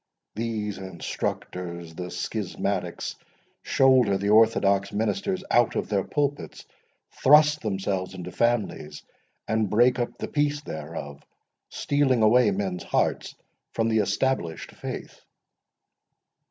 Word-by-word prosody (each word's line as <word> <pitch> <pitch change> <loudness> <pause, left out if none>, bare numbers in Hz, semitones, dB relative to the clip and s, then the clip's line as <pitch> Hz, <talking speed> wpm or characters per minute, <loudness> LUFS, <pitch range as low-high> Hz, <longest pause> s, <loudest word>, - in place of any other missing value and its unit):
These 110 -2 -3
instructors, 85 -2 -5
the 90 +2 -6
schismatics, 95 -1 -3 0.5
shoulder 130 -7 +4
the 100 +1 -2
orthodox 100 -3 +4
ministers 185 - -1
out 120 -1 +3
of - - -2
their 100 -2 +1
pulpits, 145 -1 -3 0.6
thrust 150 +1 +6
themselves 95 -2 -2
into 90 -1 -7
families, 110 -11 -1 0.4
and 110 -2 0
break 120 +4 +3
up 120 - -3
the - - -4
peace 145 0 0
thereof, 75 - -7 0.5
stealing 135 -5 +1
away 115 +1 +5
men's 95 -2 -2
hearts - - -1 0.4
from 115 0 0
the 110 -1 +2
established 105 -5 -1
faith." - - -8
105 Hz, 110 wpm, -25 LUFS, 95-125 Hz, 0.6 s, thrust